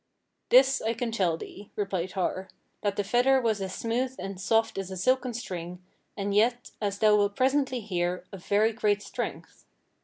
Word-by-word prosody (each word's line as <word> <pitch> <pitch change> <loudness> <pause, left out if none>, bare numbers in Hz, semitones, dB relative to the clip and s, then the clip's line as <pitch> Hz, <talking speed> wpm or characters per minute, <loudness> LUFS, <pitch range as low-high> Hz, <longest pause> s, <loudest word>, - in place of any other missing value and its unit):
"This 265 +1 +6 0.2
can 240 0 -1
I - - -5
tell 185 -7 +1
thee," 200 +4 -10
replied 190 -3 -2
Har, 190 0 -2 0.3
"that 205 -1 0
the 205 - 0
fetter 245 +6 +3
was 220 -5 0
as 190 -1 -4
smooth 250 +3 -1
and 195 -1 -6
soft 225 +1 +1
as 195 -1 -4
a 190 - -6
silken 255 +4 +1
string, 180 -5 -6 0.4
and 200 0 -2
yet, 235 +4 +2
as 200 -2 -1
thou 210 0 +5
wilt 205 -1 +2
presently 260 -1 +1
hear, 180 -3 -2
of 195 -3 -9
very 215 +2 +2
great 210 -2 +1
strength. - - -6
205 Hz, 180 wpm, -28 LUFS, 190-240 Hz, 0.4 s, This